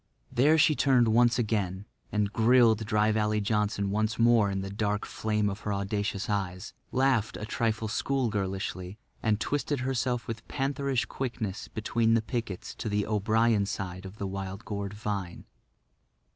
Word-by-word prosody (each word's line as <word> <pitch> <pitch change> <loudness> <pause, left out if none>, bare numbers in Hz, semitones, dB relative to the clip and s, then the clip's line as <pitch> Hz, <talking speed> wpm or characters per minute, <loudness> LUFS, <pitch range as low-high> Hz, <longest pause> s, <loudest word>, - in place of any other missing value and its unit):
There 140 +6 +4
she 155 0 +5
turned 125 -5 +4 0.3
again 105 -5 -1 0.3
and 105 -1 0
grilled 115 -2 +4
Dry 105 0 +3
Valley 105 0 +1
Johnson 105 -1 0
once 110 +2 0
more 115 -3 +4
in 95 0 -2
the 95 0 -5
dark 105 0 -1
flame 105 -1 -1
of 100 0 -3
her 105 - -3
audacious 100 0 -2
eyes, 95 -3 -3 0.2
laughed 130 -5 +2
a 105 - -5
trifle 110 -1 -1
school 130 +3 0
girlishly, 95 -2 -3 0.2
and 110 -2 +1
twisted 145 +1 -1
herself 125 -2 -1
with 115 -1 -6
pantherish 135 -3 -1
quickness 115 -5 -4
between 115 +1 +1
the 115 - +1
pickets 115 -6 -4
to 110 - -4
the 105 0 0
O'Brien 110 0 +2
side 95 -2 -5
of 95 +3 -12
the 100 - -3
wild 95 +2 -5
gourd 100 -1 -4
vine. 100 -4 -4
105 Hz, 155 wpm, -29 LUFS, 100-115 Hz, 0.3 s, she